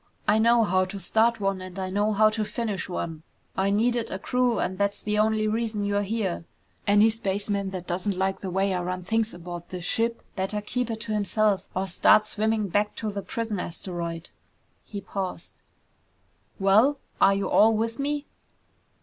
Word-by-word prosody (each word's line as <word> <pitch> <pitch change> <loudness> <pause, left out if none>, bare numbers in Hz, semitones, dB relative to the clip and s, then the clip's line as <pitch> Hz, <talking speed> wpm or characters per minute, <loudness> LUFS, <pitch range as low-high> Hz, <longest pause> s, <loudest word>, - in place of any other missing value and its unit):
I 215 - +4
know 235 +1 +5
how 185 -2 +2
to 195 +2 -7
start 225 +4 +2
one 195 -2 -1
and 185 0 -8
I 185 -1 -3
know 205 +2 +1
how 215 +1 +4
to 215 0 -1
finish 215 -3 -3
one! 165 -3 -4 0.3
I 195 +1 +1
needed 235 +3 +1
a - - -3
crew 250 +4 +1
and 185 +1 -2
that's 200 0 0
the 210 0 0
only 215 0 +2
reason 215 -1 -1
you're 205 0 +1
here! 200 -4 -2 0.4
Any 205 +2 +6
spaceman 200 -2 -1
that 185 -2 -6
doesn't 185 +2 -2
like 190 0 0
the 190 - -5
way 190 +1 +1
I 180 - -1
run 180 +1 -3
things 225 +3 0
aboard 175 0 -7
this 180 -1 -6
ship, 230 +3 0
better 195 +2 -1
keep 240 +3 -2
it 225 -1 -4
to 220 -1 -2
himself, 210 -1 +1
or 190 +1 0
start 195 +3 +5
swimming 215 0 0
back 205 +3 +1
to 215 -2 -3
the 200 0 -4
prison 225 0 -3
asteroid!" 170 -1 -5 0.5
He 200 -2 -7
paused. 185 -4 -4 1.0
"Well? 215 +9 +4 0.2
Are 195 - +6
you 195 - -1
all 220 +1 +5
with 230 +2 -2
me?" 290 +1 -1
205 Hz, 185 wpm, -26 LUFS, 190-220 Hz, 1.0 s, Any